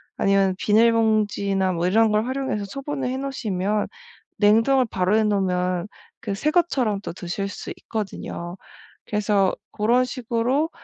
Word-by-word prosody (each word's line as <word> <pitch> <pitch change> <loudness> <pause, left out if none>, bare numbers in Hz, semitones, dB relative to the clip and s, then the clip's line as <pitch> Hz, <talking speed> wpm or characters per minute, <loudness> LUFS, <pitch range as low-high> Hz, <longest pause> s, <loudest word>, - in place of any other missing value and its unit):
아니면 195 -1 +2
비닐봉지나 210 -4 +2
뭐 170 0 -1
이런 220 +3 +4
걸 215 +1 +2
활용해서 260 -5 -2
소분을 275 +5 -4
해 260 - -2
놓으시면 215 -7 -2 0.5
냉동을 225 +5 +4
바로 185 +3 +1
해 220 - +4
놓으면 185 -3 0 0.3
그 195 - -3
새 295 +10 0
것처럼 265 - +1
또 - - -5
드실 180 +3 -4
수 - - -7
있거든요. 190 -4 -5 0.5
그래서 205 -2 +1 0.2
고런 235 +4 +2
식으로 255 +5 -1
210 Hz, 300 characters per minute, -23 LUFS, 195-250 Hz, 0.5 s, 이런